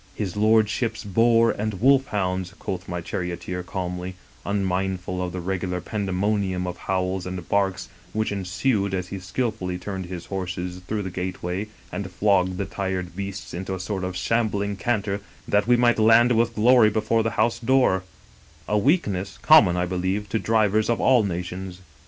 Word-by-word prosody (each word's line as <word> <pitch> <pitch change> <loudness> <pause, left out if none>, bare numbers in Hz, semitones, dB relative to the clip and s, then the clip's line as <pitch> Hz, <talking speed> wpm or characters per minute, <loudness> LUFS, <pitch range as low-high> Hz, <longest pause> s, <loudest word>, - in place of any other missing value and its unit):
* - - -28
His 100 -4 -3
lordship's 110 +2 +2
boar 115 +3 +4
and 105 0 -3
wolf 135 +2 +4
hounds,' 95 -3 -2
quoth 95 -1 -5
my 90 -1 -3
charioteer 90 +1 -4
calmly, 90 -1 -4 0.3
unmindful 95 -2 -1
of 90 -1 -2
the 90 - -4
regular 90 0 -2
pandemonium 95 -1 -1
of 90 0 -4
howls 95 0 -2
and 90 -2 -6
barks 95 -2 0 0.2
which 110 +2 -1
ensued 100 +1 0
as 90 -1 -4
he 100 - -5
skillfully 95 -2 -2
turned 95 0 -5
his 90 -2 -7
horses 90 -1 -4
through 105 -1 -2
the 95 - -5
gateway 90 +2 -3 0.2
and 95 +1 -4
flogged 95 -1 +2
the 100 - -1
tired 95 -3 -4
beasts 100 0 -6
into 95 +2 -4
a - - -6
sort 95 0 -3
of 90 -1 -3
shambling 100 -1 0
canter 100 -2 -1 0.3
that 105 +1 +2
we 120 0 +5
might 120 -1 +3
land 115 +2 +6
with 115 0 +2
glory 115 0 +6
before 110 +1 +1
the 115 - 0
house 115 +2 +2
door: 125 -6 +3 0.7
a 105 - +2
weakness 100 - 0
common, 105 - +7
I 90 - +1
be 90 +1 -3
lieve, 95 +3 -1
to 110 - 0
drivers 110 -1 +2
of 120 - +1
all 125 -4 +4
nations. 90 0 -4
95 Hz, 170 wpm, -24 LUFS, 90-110 Hz, 0.7 s, common